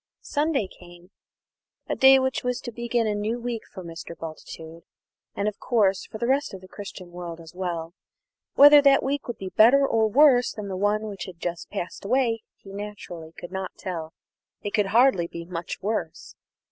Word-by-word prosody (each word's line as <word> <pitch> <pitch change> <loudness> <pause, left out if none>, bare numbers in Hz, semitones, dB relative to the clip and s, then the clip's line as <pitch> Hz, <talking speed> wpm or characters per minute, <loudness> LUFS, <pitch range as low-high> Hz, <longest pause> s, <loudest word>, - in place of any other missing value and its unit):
Ibid. - - -37
Sunday 290 -7 0
came 175 0 -16 0.8
a - - -1
day 265 0 +7
which 260 0 0
was 250 0 -1
to 240 - -6
begin 235 0 -1
a 215 - 0
new 215 +3 -2
week 235 -2 -3
for 185 - -8
Mr. 165 0 -8
Bultitude, 160 0 -9 0.5
and, 200 - -1
of 210 - -3
course, 200 -6 +1
for - - -8
the 235 - -2
rest 270 -3 +1
of 190 - -10
the 185 - -13
Christian 190 -3 -9
world 175 -1 -7
as 165 0 -12
well. 170 -2 -4 0.6
Whether 290 +1 +9
that 275 -1 +5
week 280 +1 -2
would 240 - -4
be 190 - -6
better 250 +8 +6
or 225 -3 +2
worse 250 +1 +5
than 210 -2 -6
the 190 - -3
one 205 +3 +1
which 200 -3 -6
had 185 -3 -10
just 170 -1 -4
passed 190 -4 -5
away 230 +1 +1 0.2
he 195 - -13
naturally 195 -5 -8
could 175 +1 -10
not 190 0 -5
tell 165 -3 -6 0.5
it 205 - -4
could 210 -3 +2
hardly 230 -5 +4
be 170 0 -8
much 175 0 -6
worse. 195 -6 -3
205 Hz, 195 wpm, -25 LUFS, 175-240 Hz, 0.8 s, Whether